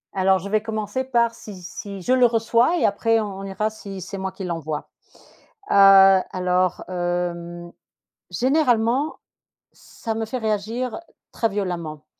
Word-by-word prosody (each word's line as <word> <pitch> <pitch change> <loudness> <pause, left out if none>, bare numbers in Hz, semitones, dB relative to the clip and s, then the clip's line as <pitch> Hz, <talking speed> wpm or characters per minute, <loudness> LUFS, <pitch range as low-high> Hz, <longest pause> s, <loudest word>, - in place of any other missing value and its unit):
Alors, 190 0 +3
je 190 +2 -7
vais 215 +1 +1
commencer 220 +2 -3
par 235 -3 +1
si 210 -4 -11
si 195 +2 -8
je 255 - +2
le 250 -1 +5
reçois 235 +7 +2
et - - +2
après 225 +2 +2
on 200 -3 -4
on - - -7
ira 210 +3 -2
si 200 -3 -9
c'est 190 +2 -7
moi 190 0 -3
qui 190 +1 -8
l'envoie. 160 -4 -4 0.8
Heu, - - +2
alors, 190 -2 +5
hem, 175 -1 -3 0.6
généralement, 255 - +1 0.6
ça 225 - -7
me 225 0 -3
fait 225 +4 -4
réagir 225 +5 -2 0.3
très 225 - 0
violemment. 170 -7 -4
200 Hz, 150 wpm, -22 LUFS, 185-225 Hz, 0.8 s, le